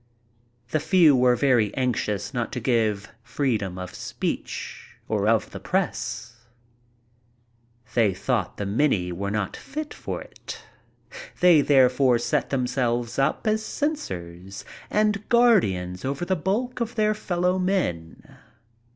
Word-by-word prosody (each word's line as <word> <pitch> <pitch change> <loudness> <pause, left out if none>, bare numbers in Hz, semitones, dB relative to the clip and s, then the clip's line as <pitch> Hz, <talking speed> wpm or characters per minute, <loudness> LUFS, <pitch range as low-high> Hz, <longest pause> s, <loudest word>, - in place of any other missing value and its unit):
The 155 - +2
few 165 -3 +5
were 125 -1 +4
very 120 -5 +2
anxious 120 -4 -1
not 120 -2 -2
to - - -2
give 110 -4 0
freedom 115 -6 -2
of 90 -1 -7
speech - - -5
or 105 -1 0
of 110 -1 +2
the - - -7
press. 120 - -2 1.6
They 110 -4 +3
thought - - -1
the 100 - -3
many 100 -4 +1
were 100 +3 -3
not 105 -1 -2
fit 305 +2 -6
for - - -5
it - - -10 0.8
They 175 -4 +6
therefore 130 -2 +4
set 120 - -1
themselves 125 -2 -1
up 135 +10 +1
as 215 0 +1
censors 95 - -4 0.2
and 210 -1 0
guardians 100 - +3
over 140 +6 -2
the 190 - +1
bulk 210 +10 -2
of 235 0 -2
their 215 -1 +2
fellow 180 -2 0
men. 180 - -2
125 Hz, 125 wpm, -25 LUFS, -, 1.6 s, They